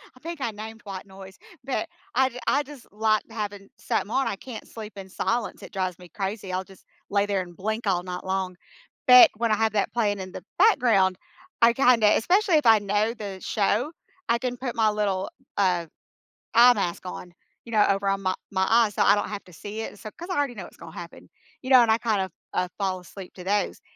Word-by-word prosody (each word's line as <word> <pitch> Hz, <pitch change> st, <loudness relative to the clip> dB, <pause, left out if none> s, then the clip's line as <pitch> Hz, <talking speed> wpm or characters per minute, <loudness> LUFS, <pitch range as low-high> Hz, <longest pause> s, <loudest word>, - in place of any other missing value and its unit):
I 255 Hz, -, -17 dB
think 335 Hz, -1 st, -6 dB
I 230 Hz, -, -1 dB
named 220 Hz, +1 st, -9 dB
white 195 Hz, -1 st, -7 dB
noise, 190 Hz, 0 st, -12 dB, 0.3 s
but 275 Hz, +5 st, -2 dB, 0.3 s
I 265 Hz, +1 st, +4 dB
j 250 Hz, -1 st, -9 dB
I 290 Hz, -, +3 dB
just 285 Hz, -3 st, -12 dB
like 215 Hz, 0 st, +2 dB
having 205 Hz, -2 st, -5 dB
something 210 Hz, -, -2 dB
on, 270 Hz, +2 st, +1 dB
I -, -, -1 dB
can't 235 Hz, -2 st, -9 dB
sleep 220 Hz, -1 st, -9 dB
in 190 Hz, -1 st, -8 dB
silence, 230 Hz, +3 st, -2 dB
it -, -, -11 dB
drives 185 Hz, -2 st, -2 dB
me 180 Hz, -1 st, -13 dB
crazy, 195 Hz, 0 st, -4 dB
I'll 185 Hz, +1 st, -1 dB
just 190 Hz, 0 st, -18 dB, 0.2 s
lay 200 Hz, 0 st, +2 dB
there 195 Hz, -2 st, 0 dB
and 175 Hz, -1 st, -10 dB
blink 220 Hz, +2 st, -3 dB
all 180 Hz, -2 st, +1 dB
night 180 Hz, -1 st, -6 dB
long, 190 Hz, -1 st, -2 dB, 0.5 s
but 250 Hz, 0 st, +10 dB
when 230 Hz, -1 st, 0 dB
I -, -, +4 dB
have 220 Hz, -1 st, +1 dB
that 205 Hz, -, 0 dB
playing 205 Hz, -4 st, +1 dB
in 185 Hz, -1 st, -6 dB
the -, -, -8 dB, 0.2 s
background, 230 Hz, -, +4 dB, 0.4 s
I 235 Hz, 0 st, +6 dB
kinda 240 Hz, -5 st, +5 dB
especially 365 Hz, -, +3 dB
if 300 Hz, -, 0 dB
I 220 Hz, -1 st, +7 dB
know 205 Hz, +3 st, 0 dB
the 200 Hz, -4 st, -7 dB
show, 220 Hz, +7 st, 0 dB, 0.4 s
I 235 Hz, -, +4 dB
can 245 Hz, 0 st, -3 dB
put 250 Hz, -1 st, -4 dB
my 220 Hz, -1 st, +3 dB
little, 200 Hz, -3 st, -1 dB, 0.3 s
uh, 180 Hz, -4 st, +2 dB, 0.7 s
eye 245 Hz, +1 st, +8 dB
mask 185 Hz, -4 st, -3 dB
on, 180 Hz, -1 st, -7 dB, 0.3 s
you 230 Hz, -, -10 dB
know, 210 Hz, -1 st, +5 dB
over 195 Hz, 0 st, +1 dB
on 195 Hz, 0 st, 0 dB
my 185 Hz, -, +1 dB, 0.2 s
my 190 Hz, -1 st, +1 dB
eyes 225 Hz, -2 st, +4 dB
so -, -, +3 dB
I 200 Hz, -, +6 dB
don't 205 Hz, -, -2 dB
have 205 Hz, -1 st, -6 dB
to 180 Hz, -, -16 dB
see 210 Hz, +6 st, -6 dB
it, 205 Hz, -, -7 dB
so 215 Hz, -, -7 dB
'cause 345 Hz, +2 st, -8 dB
I -, -, -1 dB
already 280 Hz, -4 st, 0 dB
know -, -, -6 dB
what's -, -, -15 dB
gonna -, -, -11 dB
happen, -, -, -10 dB, 0.3 s
you 260 Hz, -, -7 dB
know, 255 Hz, -2 st, +8 dB
and 225 Hz, -2 st, +4 dB
I 220 Hz, -, +4 dB
kind 220 Hz, -4 st, +1 dB
of, 190 Hz, -2 st, -4 dB, 0.2 s
uh, 180 Hz, 0 st, 0 dB
fall 190 Hz, -2 st, -1 dB
asleep 185 Hz, +1 st, -11 dB
to 180 Hz, -, -9 dB
those, 205 Hz, +2 st, -1 dB
210 Hz, 230 wpm, -25 LUFS, 190-235 Hz, 0.7 s, but